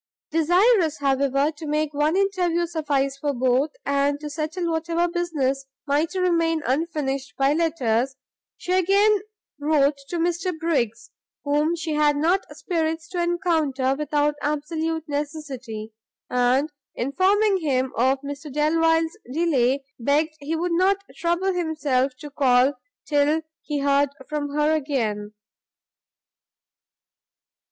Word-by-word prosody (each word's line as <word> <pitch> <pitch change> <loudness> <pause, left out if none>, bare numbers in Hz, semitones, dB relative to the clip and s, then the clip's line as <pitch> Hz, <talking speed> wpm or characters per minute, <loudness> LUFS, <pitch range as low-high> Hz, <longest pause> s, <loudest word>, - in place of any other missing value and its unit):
Desirous, 350 +1 +3
however, 275 +1 +1
to 310 0 -9
make 300 0 0
one 300 +3 +1
interview 365 -3 +1
suffice 290 -5 -1
for 285 +1 -1
both, 255 +4 +2 0.2
and 280 +1 +1
to 300 0 -6
settle 320 +3 -2
whatever 335 +1 0
business 295 -6 -1 0.2
might 300 +5 0
remain 335 -3 +1
unfinished 275 -4 -2
by 275 +1 +3
letters, 270 -6 0 0.4
she 360 - -5
again 395 +3 +4 0.4
wrote 290 -1 +2
to 350 - -2
Mr 345 +2 0
Briggs, 235 -9 -1 0.3
whom 300 +3 +1
she 325 -2 -3
had 300 -1 +3
not 345 +6 +2
spirits 325 -1 -2
to 355 - -2
encounter 320 -7 +1
without 295 +1 0
absolute 315 +2 -2
necessity, 275 -7 -5 0.4
and 250 +4 +2 0.2
informing 385 - +2
him 265 -6 0
of 260 +3 +2
Mr 285 +1 -7
Delvile's 325 +2 +2 0.2
delay, 275 -4 +1 0.2
begged 295 +6 +1
he 295 +3 -3
would 345 +2 -1
not 375 +3 +3 0.2
trouble 345 +3 0
himself 295 -6 0
to 295 +2 -9
call 265 -1 +3 0.3
till 300 +2 +2 0.2
he 295 - -3
heard 280 0 +2 0.2
from 295 -1 -3
her 300 +1 +3
again. 225 -9 -2
300 Hz, 120 wpm, -24 LUFS, 275-335 Hz, 0.4 s, again